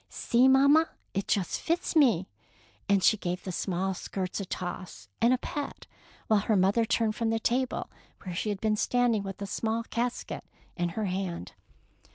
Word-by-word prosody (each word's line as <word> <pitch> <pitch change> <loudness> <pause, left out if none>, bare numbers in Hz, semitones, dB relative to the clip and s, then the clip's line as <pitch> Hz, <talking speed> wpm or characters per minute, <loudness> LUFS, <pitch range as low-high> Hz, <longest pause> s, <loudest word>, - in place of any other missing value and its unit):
" - - -46
See, 245 +2 +3
mamma, 280 +4 +5 0.2
it 195 0 -2
just 190 -4 0
fits 335 +1 -1
me; 230 - +4 0.6
and 200 -2 +3
she 215 - +5
gave 180 -2 -3
the 185 - -4
small 190 +1 -1
skirts 185 +1 -4
a 200 - -3
toss 175 - -6
and 235 - +5
a 255 - +4
pat, 290 +2 -5 0.4
while 215 -2 +3
her 215 +2 +1
mother 195 +4 +3
turned 225 -1 +1
from 230 -1 0
the 225 0 +1
table 250 +3 0 0.4
where 185 - -5
she 200 +5 -2
had 205 -2 -2
been 215 0 +1
standing 245 -2 +2
with 195 0 -6
a - - -2
small 220 +3 -1
casket 240 +1 -3 0.3
in 175 0 -1
her 215 - 0
hand. 185 - -3
215 Hz, 185 wpm, -29 LUFS, 190-240 Hz, 0.6 s, mamma